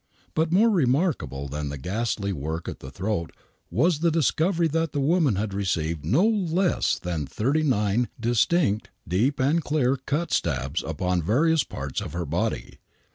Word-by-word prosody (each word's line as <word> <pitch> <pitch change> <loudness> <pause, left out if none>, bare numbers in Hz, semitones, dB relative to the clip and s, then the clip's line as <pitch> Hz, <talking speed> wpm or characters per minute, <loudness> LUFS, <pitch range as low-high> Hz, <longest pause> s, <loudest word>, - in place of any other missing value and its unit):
But 160 +1 +1
more 220 +6 +5
remarkable 130 - +1
than 75 +1 -4
the 70 - -5
ghastly 100 - -2
work 80 +1 -4
at - - -5
the 65 - -9
throat 90 +4 -3 0.4
was 155 +5 +2
the 170 +1 +3
discovery 165 +2 +2
that 165 +1 -1
the 145 - -1
woman 150 - +3
had 100 +1 -2
received 85 -6 -1
no 125 - +3
less 190 -4 +1
than 85 -5 -3
thirty 130 - 0
nine 115 -4 +1
distinct 115 - +1 0.2
deep 120 +12 +1
and 150 +5 +2
clear 140 -3 +1
cut 145 +6 -2
stabs 70 +1 0
upon 90 +3 -1
various 150 - +3
parts 65 0 -5
of - - -6
her 85 0 -2
body. 85 +10 -2
115 Hz, 160 wpm, -25 LUFS, -, 0.4 s, more